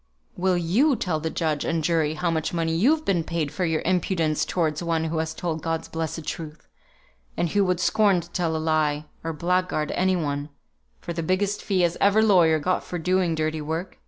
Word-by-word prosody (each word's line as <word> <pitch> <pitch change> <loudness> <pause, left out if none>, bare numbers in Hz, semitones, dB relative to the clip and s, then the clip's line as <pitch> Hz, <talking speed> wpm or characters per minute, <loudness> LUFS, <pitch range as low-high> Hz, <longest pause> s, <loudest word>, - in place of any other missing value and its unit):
"Will 185 0 +1
you 220 - +3
tell 180 -7 -1
the 160 +1 -2
judge 155 -3 -1
and 165 -1 -1
jury 160 -1 +1
how 170 +2 0
much 160 +1 -2
money 165 -1 0
you've 295 - +2
been 175 -4 +1
paid 160 -3 -2
for 185 - -1
your 160 -1 0
impudence 170 -3 +1
towards 160 -3 -1
one 165 -2 0
who 160 0 -1
has 160 0 -3
told 160 -3 -3
God's 165 0 -2
blessed 160 -1 -4
truth, 155 -1 -7 0.7
and 175 - 0
who 200 +4 +2
would 180 -2 0
scorn 200 0 +3
to 170 0 -9
tell 170 -3 -1
a - - 0
lie, 155 -1 0 0.2
or 165 - -2
blackguard 175 -1 0
any 185 +1 +1
one, 145 -3 -2 0.5
for 170 - -5
the 170 - -3
biggest 190 +5 0
fee 190 -3 +1
as 170 -1 +1
ever 205 +2 +5
lawyer 175 -7 +5
got 180 +5 0
for 175 - -5
doing 180 0 +1
dirty 155 0 -1
work? 160 +5 -4
165 Hz, 205 wpm, -24 LUFS, 160-180 Hz, 0.7 s, ever